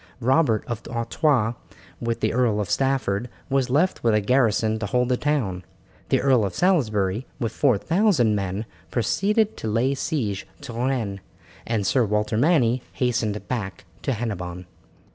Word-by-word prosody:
Robert 130 -2 +2
of 120 -2 -4
Artois, 120 0 +1 0.5
with 115 0 -2
the - - +1
Earl 120 -4 +2
of 105 0 -2
Stafford, 125 -4 0 0.2
was 135 -2 +1
left 155 +9 +1
with 115 -2 +3
a - - +4
garrison 110 -1 +2
to 105 - -3
hold 125 +4 +1
the 125 - +3
town. 120 -11 -1 0.5
The - - +3
Earl 130 -4 +4
of 95 -3 -3
Salisbury, 110 - +1
with 115 -4 -1
four 130 -7 +2
thousand 165 - +2
men, 100 +1 -2 0.2
proceeded 205 - +1
to - - -5
lay 115 +6 +1
siege 125 - -2
to 140 -4 -8
Rennes, 120 -5 -1 0.5
and 110 -3 0
Sir 125 +5 +3
Walter 105 0 0
Manny 125 -2 +3
hastened 110 -4 -1
back 100 -7 -4 0.2
to 135 - -1
Hennebon. 90 -6 -4
115 Hz, 155 wpm, -24 LUFS, 105-135 Hz, 0.5 s, a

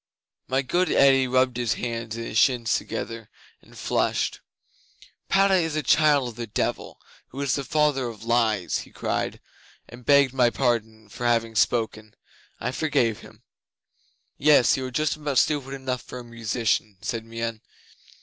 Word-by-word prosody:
'My 130 +1 0
good 175 +8 +1
Eddi 135 -1 +5
rubbed 130 -1 +2
his 120 -4 0
hands 115 -2 -4
and 115 0 -5
his 110 - -3
shins 120 -4 +3
together, 115 -2 -5 0.3
and - - -18
flushed. - - -1 0.9
"Padda 195 0 +4
is 165 -4 +1
a 155 - -1
child 145 -4 +3
of 115 - -11
the 120 -1 -5
Devil, 105 - -3 0.3
who 135 - -10
is 140 -2 0
the 140 - -1
father 145 -3 +1
of 115 -2 -9
lies!" 115 -5 +1
he - - -10
cried, - - -3 0.5
and 120 +1 -13
begged 140 -1 +4
my 125 -2 +4
pardon 110 -3 -1
for 120 +4 -4
having 115 -1 +1
spoken. 110 -1 0 0.4
I 125 - -2
forgave 125 -7 0
him. - - -16 1.0
'"Yes. 150 -5 +5
You 130 -1 -3
are - - -8
just 155 +4 0
about 145 -3 -2
stupid 140 -2 +1
enough 130 -2 -3
for - - -9
a 125 - -7
musician," 115 -3 -2
said 115 -1 -3
Meon. 115 -1 -5
120 Hz, 160 wpm, -25 LUFS, 115-140 Hz, 1.0 s, Eddi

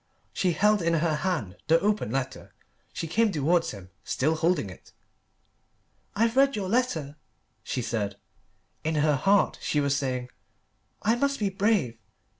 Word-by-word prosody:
She 180 -2 +1
held 210 +5 +3
in 170 0 +2
her 160 0 +1
hand 150 - -2
the 165 +2 +5
open 210 - 0
letter. 130 +2 -4 0.4
She - - -4
came 215 +7 +2
towards 165 +1 +1
him, 95 -2 -9
still 155 +5 0
holding 160 - 0
it. 90 - -16 1.2
"I've 230 +2 +2
read 275 +1 +4
your 195 -3 -3
letter," 170 - 0 0.5
she 125 - -3
said. 105 -4 -2 0.7
In 160 0 -1
her 150 0 +3
heart 195 +8 +2
she 150 - 0
was 140 -1 +1
saying, 130 -3 -2 0.7
"I 215 +2 +3
must 280 +3 0
be 205 -2 +1
brave. 190 - +1
165 Hz, 150 wpm, -27 LUFS, 135-205 Hz, 1.2 s, the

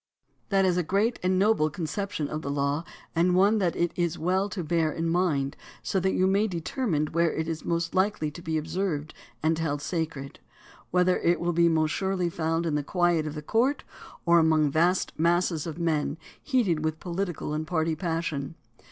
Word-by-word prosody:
That 195 -1 +3
is 180 -1 +2
a - - +3
great 200 +8 0
and 185 +1 +1
noble 195 -6 +3
conception 160 +1 -3
of 155 +1 -4
the 140 - -5
law 140 +2 0 0.3
and 175 +2 +3
one 200 +4 +4
that 175 -4 +1
it 175 -1 0
is 175 -1 -1
well 185 +5 0
to 185 -2 -4
bear 160 0 +1
in 165 +1 -2
mind 165 -6 +1 0.3
so 190 - 0
that 190 +1 +1
you 185 - +2
may 200 +3 +3
determine 180 - -1
where 170 0 +2
it 160 0 -3
is 160 -1 -4
most 170 -1 -1
likely 185 -5 +1
to 175 - -10
be 160 -1 -1
observed 155 -1 -2 0.3
and 160 +1 +2
held 145 -3 -1
sacred; 150 -3 -4 0.5
whether 180 0 +3
it 170 +1 +2
will 175 0 0
be 170 0 +4
most 155 -1 +2
surely 190 -2 -1
found 165 +1 -1
in 160 - 0
the 150 - +1
quiet 175 -1 +1
of 150 - -5
the 150 - -6
court 245 - +1 0.4
or 170 -1 +6
among 155 -2 +3
vast 175 +5 +2
masses 170 -1 +1
of 160 -1 -5
men 160 -3 0 0.2
heated 210 - +1
with 155 0 -1
political 175 -4 -3
and 155 +1 -3
party 160 -2 0
passion. 160 -3 -3
170 Hz, 195 wpm, -27 LUFS, 155-185 Hz, 0.5 s, or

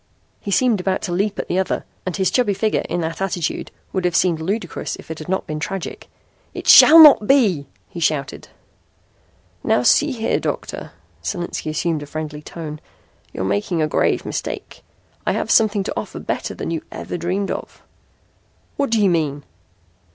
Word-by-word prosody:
He - - -7
seemed 225 -1 +2
about 190 0 -1
to 185 - -3
leap 200 +3 -1
at - - -4
the 185 - 0
other, 190 - -2 0.2
and 185 - -2
his 190 -1 +1
chubby 230 -6 +2
figure, 215 +2 0
in 175 - -1
that 165 +2 -4
attitude, 175 -4 -2 0.2
would 190 - -1
have 175 -2 0
seemed 170 -3 +2
ludicrous 200 +7 -3
if - - -11
it 160 - -6
had 155 - -9
not 190 - -1
been 155 0 -4
tragic. 190 +4 -5 0.5
"It - - -6
shall 320 - +10
not 295 -9 +9
be!" 200 - +3 0.2
he 175 - -8
shouted. 150 -4 -1 1.2
"Now 125 - +2
see 295 - +4
here, 225 -4 -1
Doctor" - - -5 0.3
Solinski 175 -4 -4
assumed 155 0 -1
a 145 - -8
friendly 150 0 -6
tone 155 -1 -8 0.5
"you're 95 - -4
making 100 - -1
a 155 - +2
grave - - +1
mistake. - - -5 0.5
I - - +3
have - - -2
something 210 -2 +3
to - - -4
offer - - -5
better - - -4
than - - -4
you 165 - -2
ever - - -6
dreamed 180 +4 -2
of." - - -7 0.9
"What 280 -1 0
do 225 -1 +2
you 205 - +4
mean?" 150 -4 -1
180 Hz, 180 wpm, -20 LUFS, 155-205 Hz, 1.2 s, shall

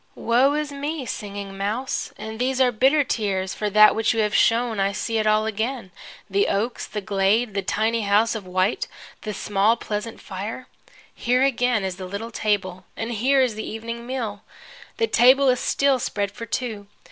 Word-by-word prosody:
Woe 255 +5 +2
is 300 -1 -2
me, 285 0 -4
Singing 200 -3 -6
Mouse, 215 +7 -2
and 220 +1 -7
these 260 +1 0
are 255 -1 +4
bitter 270 +6 +3
tears 195 -7 -1
for 210 - -2
that 215 +1 +7
which 225 0 +1
you 225 - +2
have 210 -1 0
shown 230 -2 +2
I 195 +1 +1
see 225 +3 -1
it 215 - 0
all 215 0 +3
again, 220 0 -3 0.4
the 200 0 +1
oaks, 225 +5 -1
the 210 - -5
glade, 200 +4 +1
the 200 - -1
tiny 225 +3 0
house 210 +2 +3
of 210 -5 -6
white, 185 +3 0 0.3
the 215 - -4
small 205 +3 +1
pleasant 215 +1 -5
fire. 205 +6 -6 0.5
Here 250 +2 +1
again 245 -5 +1
is 190 -2 -3
the 185 - -6
little 205 +5 -6
table, 190 -4 -1
and 225 +1 -3
here 260 +5 +2
is 250 -3 0
the 215 +1 -6
evening 230 +2 -6
meal. 225 -6 -4 0.6
The 460 - +2
table 265 - +5
is 250 -1 +2
still 275 -2 +2
spread 205 -5 -2
for 230 +3 -8
two. 215 -4 -4
220 Hz, 185 wpm, -23 LUFS, 205-250 Hz, 0.6 s, that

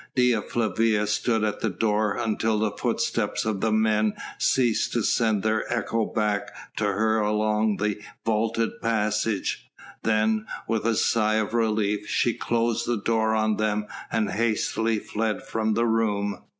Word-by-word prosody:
Dea 125 -3 +3
Flavia 110 -1 +1
stood 110 +1 0
at 105 -1 -1
the 110 - 0
door 105 +1 0
until 110 0 0
the 105 0 0
footsteps - - -1
of 105 -3 -1
the 110 - +1
men 110 -1 +2 0.2
ceased 120 -4 +2
to 120 - +1
send 110 -3 +1
their 110 +1 0
echo 115 -2 0
back 105 -2 -1 0.3
to 110 - 0
her 110 +2 +1
along 105 0 +1
the 105 0 -1 0.2
vaulted 115 +1 0
passage. 110 -2 -1 0.3
Then, 110 0 +1 0.2
with 110 -1 -1
a 115 - +2
sigh 110 0 +2
of 110 0 -1
relief, 105 -3 0
she 120 - +2
closed 115 0 -1
the 120 -1 +1
door 110 +1 +1
on 110 -1 +1
them 105 -1 0 0.3
and 110 -3 0
hastily 115 0 0
fled 110 0 -2
from 110 -1 -1
the 115 +1 +2
room. 105 -3 0
110 Hz, 150 wpm, -25 LUFS, 105-115 Hz, 0.3 s, Dea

